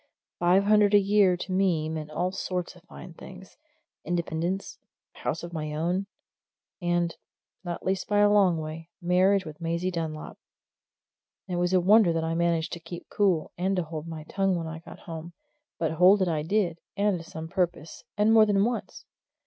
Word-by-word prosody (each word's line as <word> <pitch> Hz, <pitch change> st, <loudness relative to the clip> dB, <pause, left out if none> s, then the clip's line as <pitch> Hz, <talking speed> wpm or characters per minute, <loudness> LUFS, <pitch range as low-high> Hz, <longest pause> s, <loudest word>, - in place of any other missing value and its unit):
Five 180 Hz, +3 st, +4 dB
hundred 210 Hz, 0 st, +4 dB
a -, -, +8 dB
year 200 Hz, -2 st, +3 dB
to 185 Hz, -, -6 dB
me 185 Hz, -5 st, +1 dB
meant 155 Hz, -1 st, -5 dB
all 180 Hz, +4 st, -1 dB
sorts 180 Hz, -2 st, -4 dB
of 180 Hz, -, -17 dB
fine 180 Hz, -1 st, -11 dB
things 190 Hz, +3 st, -12 dB, 0.5 s
independence, 175 Hz, +2 st, -2 dB, 0.3 s
and -, -, -15 dB
a -, -, -15 dB
house -, -, -1 dB
of 170 Hz, 0 st, -7 dB
my 155 Hz, -2 st, -4 dB
own, 175 Hz, +5 st, -1 dB, 0.7 s
and, 175 Hz, -1 st, 0 dB, 0.5 s
not 175 Hz, -2 st, -5 dB
least 190 Hz, 0 st, -1 dB
by 205 Hz, -, +1 dB
a 205 Hz, 0 st, +5 dB
long 195 Hz, -5 st, +4 dB
way, 160 Hz, +1 st, -6 dB
marriage 185 Hz, +2 st, +3 dB
with 155 Hz, +1 st, -10 dB
Maisie 170 Hz, +2 st, -1 dB
Dunlop. 160 Hz, -3 st, -5 dB, 1.1 s
And 180 Hz, -2 st, -3 dB
it -, -, 0 dB
was 175 Hz, 0 st, +1 dB
a 185 Hz, -, +5 dB
wonder 200 Hz, +1 st, +5 dB
that 165 Hz, 0 st, -1 dB
I 160 Hz, 0 st, -1 dB
managed 170 Hz, -1 st, 0 dB
to 170 Hz, -, -5 dB
keep 170 Hz, +1 st, -10 dB
cool, 190 Hz, -6 st, +1 dB
and 190 Hz, +2 st, +1 dB
to 180 Hz, -, 0 dB
hold 160 Hz, 0 st, -7 dB
my 160 Hz, -2 st, -7 dB
tongue 195 Hz, +3 st, 0 dB
when 170 Hz, -1 st, -3 dB
I 160 Hz, 0 st, -6 dB
got 165 Hz, -, -13 dB
home 165 Hz, 0 st, -8 dB, 0.4 s
but 165 Hz, -1 st, -1 dB
hold 185 Hz, +4 st, +5 dB
it -, -, 0 dB
I 160 Hz, -3 st, 0 dB
did, 175 Hz, 0 st, 0 dB, 0.2 s
and 200 Hz, -3 st, +1 dB
to -, -, -9 dB
some 160 Hz, -1 st, -8 dB
purpose, 175 Hz, -3 st, -3 dB
and 210 Hz, +2 st, +4 dB
more 220 Hz, -1 st, +7 dB
than 200 Hz, 0 st, +3 dB
once. 240 Hz, 0 st, -4 dB
175 Hz, 195 wpm, -27 LUFS, 165-195 Hz, 1.1 s, a